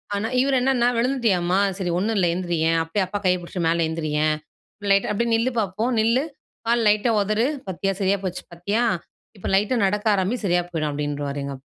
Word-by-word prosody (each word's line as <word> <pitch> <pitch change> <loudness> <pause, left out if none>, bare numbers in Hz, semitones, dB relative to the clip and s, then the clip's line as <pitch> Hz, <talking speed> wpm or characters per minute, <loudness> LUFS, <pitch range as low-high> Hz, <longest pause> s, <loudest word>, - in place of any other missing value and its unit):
ஆனா, 210 +2 -1
இவர் 270 0 +2
என்னன்னா 250 -2 +2
"விழுந்துட்டியாம்மா 220 -8 +1 0.2
சரி, 180 -3 -2
ஒண்ணு 215 +5 0
இல்ல 185 - +3
எழுந்திரியே 170 -3 0
அப்படியே 185 +4 -1
அப்பா 205 +2 -3
கைய 180 0 +4
பிடிச்சு 175 +1 -5
மேல 165 0 +2
எழுந்திரியே 155 -1 -1 0.6
லைட்டா 195 +1 +3
அப்படியே 235 +3 0
நில்லு 240 +3 +1
பாப்போம். 215 +4 -1
நில்லு 230 +5 +3 0.4
கால், 235 0 +3
லைட்டா 210 +3 +3
உதறு 215 +4 +1 0.2
பாத்தியா 195 +1 -1
சரியா 195 +1 +2
போச்சு 180 -1 -4
பார்த்தியா 200 +7 -1 0.5
இப்ப - - -6
லைட்டா 210 +6 +2
நடக்க 210 +2 -1
ஆரம்பி 190 +5 0
சரியா 175 -1 +2
போயிடும்" 155 -3 -1
அப்படின்றுவாரு 145 -1 -3
எங்க 140 - -4
அப்பா. - - -21
195 Hz, 180 wpm, -23 LUFS, 170-225 Hz, 0.6 s, கைய